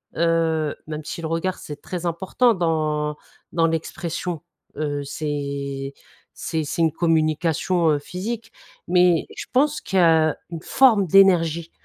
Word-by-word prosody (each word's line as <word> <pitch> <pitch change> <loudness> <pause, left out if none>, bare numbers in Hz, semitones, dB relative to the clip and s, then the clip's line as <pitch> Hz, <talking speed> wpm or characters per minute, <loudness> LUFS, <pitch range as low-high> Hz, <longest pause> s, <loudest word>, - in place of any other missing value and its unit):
heu, 165 -2 +1
même 155 0 -5
si 165 +3 -6
le 160 - -3
regard, 165 +3 -2
c'est 150 -1 -9
très 180 -1 -5
important 190 +8 +2
dans, 155 -4 -1 0.3
dans 165 -1 +2
l'expression, 165 +1 -3 0.4
heu, 145 -1 -2
c'est 140 -2 -4 0.4
c'est 160 -2 -3
c'est 150 +3 -3
une 160 -1 +3
communication, 165 +1 +1
heu, 145 - +1
physique, 215 +9 -6 0.4
mais 180 -2 +3
je - - -6
pense 295 +3 +2
que 165 -4 +3 0.2
une 165 -2 -6
forme 225 -8 +4
d'énergie. 170 -3 +4
165 Hz, 130 wpm, -22 LUFS, 155-180 Hz, 0.4 s, forme